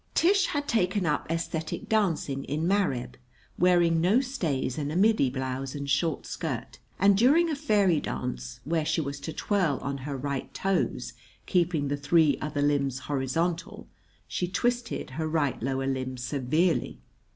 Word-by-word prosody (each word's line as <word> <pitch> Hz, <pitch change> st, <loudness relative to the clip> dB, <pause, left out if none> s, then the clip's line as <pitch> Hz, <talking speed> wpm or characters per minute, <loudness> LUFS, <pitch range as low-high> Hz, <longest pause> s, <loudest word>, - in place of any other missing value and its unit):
Tish 390 Hz, +3 st, +4 dB
had 290 Hz, 0 st, -2 dB
taken 190 Hz, -3 st, +1 dB
up 150 Hz, -2 st, 0 dB
æsthetic 165 Hz, -1 st, -3 dB
dancing 165 Hz, -10 st, 0 dB
in 155 Hz, +4 st, -1 dB
Mareb, 180 Hz, -11 st, 0 dB, 0.4 s
wearing 175 Hz, -2 st, +4 dB
no 195 Hz, +8 st, +4 dB
stays 165 Hz, -, -2 dB
and 145 Hz, 0 st, -2 dB
a -, -, -4 dB
middy 205 Hz, -, +4 dB
blouse 130 Hz, +1 st, -4 dB
and 140 Hz, -1 st, -4 dB
short 160 Hz, +1 st, 0 dB
skirt; -, -, -5 dB, 0.2 s
and 200 Hz, +1 st, +5 dB
during 295 Hz, -, +4 dB
a -, -, 0 dB
fairy 205 Hz, -, +3 dB
dance, 60 Hz, -, -5 dB
where 160 Hz, +1 st, 0 dB
she 155 Hz, -, 0 dB
was 140 Hz, -2 st, -3 dB
to 160 Hz, -, -5 dB
twirl 175 Hz, -7 st, 0 dB
on 140 Hz, 0 st, -3 dB
her 140 Hz, +1 st, -4 dB
right 140 Hz, 0 st, -3 dB
toes, 195 Hz, -1 st, -1 dB, 0.3 s
keeping 170 Hz, -5 st, +1 dB
the 145 Hz, +1 st, -1 dB
three 145 Hz, +1 st, +3 dB
other 150 Hz, -1 st, -1 dB
limbs 140 Hz, -3 st, +1 dB
horizontal, 155 Hz, +6 st, -2 dB, 0.4 s
she 180 Hz, -, -2 dB
twisted 240 Hz, -, -1 dB
her 160 Hz, -, 0 dB
right 155 Hz, -4 st, 0 dB
lower 135 Hz, +2 st, -1 dB
limb 130 Hz, -1 st, -2 dB
severely. 140 Hz, +7 st, 0 dB
160 Hz, 155 wpm, -27 LUFS, 140-190 Hz, 0.4 s, and